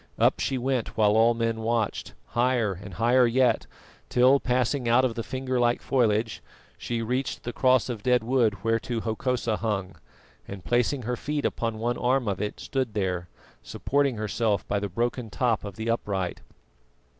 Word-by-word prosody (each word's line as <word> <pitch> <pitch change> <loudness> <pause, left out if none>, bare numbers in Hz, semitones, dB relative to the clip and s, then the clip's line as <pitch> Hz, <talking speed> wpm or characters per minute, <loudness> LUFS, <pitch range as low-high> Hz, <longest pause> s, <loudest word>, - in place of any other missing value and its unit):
Up - - +3
she 135 - -1
went 125 -2 -2
while 105 -2 +4
all 115 +2 +4
men 115 -1 -1
watched, 115 -2 -1
higher 120 -4 +1
and 95 0 -10
higher 120 +4 +4
yet, 125 +1 +2 0.4
till 130 +3 +5
passing 125 0 0
out 125 +2 +5
of 125 - 0
the 115 - -4
finger 130 +1 -2
like 120 0 +2
foliage 115 -3 0 0.3
she 115 -1 -3
reached 125 +4 -2
the 120 - -5
cross 130 0 +3
of 120 -5 -4
dead 125 +1 +2
wood 110 -5 +1
whereto 115 +1 0
Hokosa 115 0 -1
hung, 100 -4 -2 0.5
and 95 -2 -8
placing 120 +2 +1
her 125 +2 -2
feet 145 +3 -3
upon 115 -2 -1
one 120 +2 -2
arm 125 -1 +1
of 100 -1 -1
it, 105 - -4
stood 130 -5 -3
there, 90 -4 -2 0.3
supporting 140 -2 0
herself 110 0 -1
by 100 - 0
the 100 0 -3
broken 120 +4 -2
top 115 0 0
of 100 -2 -7
the 110 +2 -5
upright. 100 -6 -2
115 Hz, 170 wpm, -26 LUFS, 110-125 Hz, 0.5 s, till